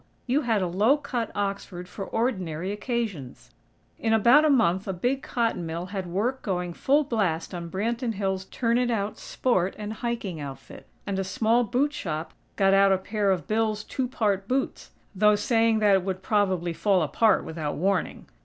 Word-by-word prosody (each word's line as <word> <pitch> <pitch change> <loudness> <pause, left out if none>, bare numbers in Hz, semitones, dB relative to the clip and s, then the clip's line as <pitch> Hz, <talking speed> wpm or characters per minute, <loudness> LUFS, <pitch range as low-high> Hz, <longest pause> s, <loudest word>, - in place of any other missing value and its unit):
you 270 +4 +1
had 225 -7 +1
a - - 0
low 210 +11 +3
cut 250 -5 -3
Oxford 195 -3 -3
for 195 - -7
ordinary 190 -8 -2
occasions! 205 - -4 0.5
In 225 -1 +1
about 240 +7 +6
a 310 - +4
month 190 -8 +2
a 195 - -1
big 250 +9 -1
cotton 230 -7 -1
mill 165 +2 -4
had 190 -3 -3
work 225 +9 -1
going 180 -3 -2
full 285 - +2
blast 200 - -1
on 170 -1 -5
"Branton 230 +5 -2
Hills' 190 -1 -2
Turn 235 +3 0
it 250 -1 +1
out 210 -3 -2
Sport 190 -8 0
and 210 0 -5
Hiking 220 -7 -4
Outfit," 140 -2 -9 0.2
and 195 -1 -2
a - - 0
small 220 +5 +2
boot 255 +6 0
shop 160 - -4 0.2
got 195 -1 +3
out 195 0 +5
a 190 - +4
pair 205 +2 -1
of 185 -3 0
Bill's 215 -1 0
"two 260 +3 -3
part 205 -5 -1
boots," 265 +3 -2 0.2
though 210 +2 +4
saying 225 +1 +2
that 205 -1 +5
it 190 -2 +3
would 190 0 -4
"probably 185 -5 +1
fall 190 0 +2
apart 210 +9 +3
without 155 -2 -4
warning!" 190 +1 -1
205 Hz, 180 wpm, -26 LUFS, 185-235 Hz, 0.5 s, about